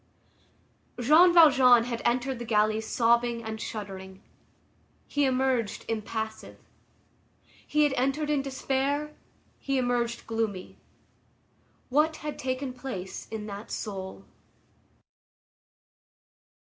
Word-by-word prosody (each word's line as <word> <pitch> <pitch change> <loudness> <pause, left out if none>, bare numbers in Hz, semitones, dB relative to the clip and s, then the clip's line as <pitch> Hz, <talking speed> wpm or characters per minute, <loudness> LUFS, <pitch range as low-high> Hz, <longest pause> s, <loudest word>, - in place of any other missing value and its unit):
Jean 310 +9 +6
Valjean 265 -8 +7
had 235 -1 -4
entered 250 +1 0
the - - -4
galleys 215 -1 +1
sobbing 235 0 +2
and 220 -1 -6
shuddering; 190 -2 -7 0.8
he 290 -1 0
emerged 255 -4 0
impassive. 220 0 -4 1.1
He 300 0 +2
had 290 -2 +2
entered 275 +4 0
in 290 -2 +2
despair; 275 +2 -2 0.5
he 275 -1 -1
emerged 245 -2 -1
gloomy. 225 -5 -3 1.1
What 305 +4 +2
had 300 -1 -6
taken 255 0 -3
place 245 -8 -7
in 220 -1 -5
that 205 +1 -8
soul? 190 - -6
240 Hz, 95 wpm, -27 LUFS, 220-270 Hz, 1.1 s, Valjean